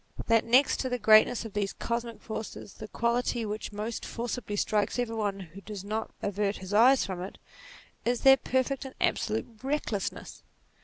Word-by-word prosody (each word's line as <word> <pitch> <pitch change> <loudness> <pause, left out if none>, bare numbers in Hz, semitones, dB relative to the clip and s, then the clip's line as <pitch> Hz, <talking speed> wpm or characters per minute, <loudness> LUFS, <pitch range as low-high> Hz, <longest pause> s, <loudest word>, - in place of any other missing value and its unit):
That 230 -1 +3
next 255 +4 +4
to 260 - -1
the 250 - -1
greatness 220 +1 +5
of 220 - -8
these 200 -1 -1
cosmic 235 -1 -4
forces, 220 -3 -6
the 215 - -9
quality 235 +1 0
which 215 +1 -4
most 215 +3 -4
forcibly 235 -3 -4
strikes 210 +2 0
every 240 -2 -1
one 205 -3 -2
who 185 +2 -11
does 200 -2 -7
not 215 +2 -3
avert 205 0 0
his 190 +1 -7
eyes 245 +5 +6
from 185 -2 -5
it, 190 - -7 0.7
is 240 0 0
their 270 0 +8
perfect 260 +2 -1
and 265 -1 -9
absolute 220 0 0 0.2
recklessness. 265 -7 -3
220 Hz, 170 wpm, -29 LUFS, 205-245 Hz, 0.7 s, their